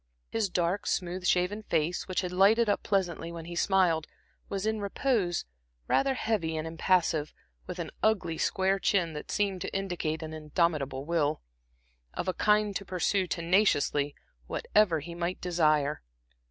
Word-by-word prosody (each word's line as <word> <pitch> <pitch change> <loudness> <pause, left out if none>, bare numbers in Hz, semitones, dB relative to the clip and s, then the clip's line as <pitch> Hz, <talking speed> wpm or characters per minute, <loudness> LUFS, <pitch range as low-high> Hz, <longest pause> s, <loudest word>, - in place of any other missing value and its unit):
His 220 -3 0
dark, 180 +2 0
smooth 180 0 -1
shaven 180 +4 +1
face, 170 -3 -1
which 185 -1 0
had 180 -2 -4
lighted 205 +5 +4
up 205 - +1
pleasantly 175 -4 -1
when 165 -1 -7
he 170 +1 -7
smiled, 175 -4 +2 0.4
was 195 0 -2
in 220 -1 0
repose 200 - 0 0.4
rather 270 -1 +2
heavy 180 -10 -1
and 155 - -3
impassive, 165 -2 +1 0.3
with 180 - -5
an 170 -3 -4
ugly, 190 -7 +1
square 190 +1 +1
chin, 175 -6 +1
that 150 - -7
seemed 200 -3 0
to - - -5
indicate 175 -5 -2
an 160 0 -6
indomitable 150 -3 -1
will, 155 -2 0 0.7
of - - -3
a 185 - +1
kind 210 0 +2
to - - -8
pursue 185 +1 0
tenaciously 165 -5 +2 0.3
whatever 185 -7 +2
he 170 +4 -8
might 175 +1 -3
desire. 155 -4 +1
180 Hz, 155 wpm, -29 LUFS, 160-195 Hz, 0.7 s, lighted